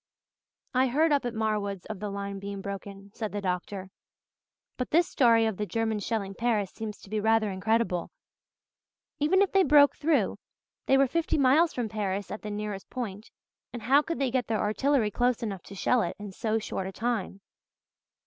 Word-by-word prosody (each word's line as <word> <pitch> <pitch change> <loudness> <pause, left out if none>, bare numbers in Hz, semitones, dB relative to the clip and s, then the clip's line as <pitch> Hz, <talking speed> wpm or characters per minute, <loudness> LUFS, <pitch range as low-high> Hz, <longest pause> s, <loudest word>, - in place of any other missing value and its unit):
"I 260 +1 +3
heard 305 +6 +2
up 285 -3 +2
at 240 -1 -3
Marwood's 210 -4 -1
of 215 -3 -6
the 210 0 -4
line 200 0 -4
being 200 0 -6
broken," 200 0 -7
said 215 -2 -4
the 205 - -3
doctor, 190 0 -3 0.8
"but 250 - -3
this 340 +2 +4
story 230 -4 +4
of 220 -4 -1
the 210 - -2
Germans 220 -2 -1
shelling 200 -4 -2
Paris 215 -3 0
seems 215 -1 -6
to - - -14
be 215 - 0
rather 220 -1 +2
incredible. 195 -1 0 1.1
Even 375 +7 +4
if 395 - -1
they 390 - +5
broke 290 -3 +6
through 310 0 +1 0.5
they 270 - +5
were 275 - +5
fifty 330 +5 0
miles 295 +5 +4
from 245 -3 -2
Paris 205 -2 -3
at 210 - -5
the 210 - -6
nearest 205 -1 -5
point 220 -4 -5 0.4
and 240 -3 -7
how 270 +6 +5
could 330 +2 -4
they 270 -2 0
get 250 -2 0
their 225 - 0
artillery 225 +1 +1
close 245 +2 +1
enough 195 -5 -4
to 200 - -12
shell 245 +5 +2
it 175 - -2
in 205 -1 -7
so 220 +3 -1
short 195 -3 -3
a - - -5
time? 210 -2 -2
220 Hz, 190 wpm, -28 LUFS, 200-250 Hz, 1.1 s, broke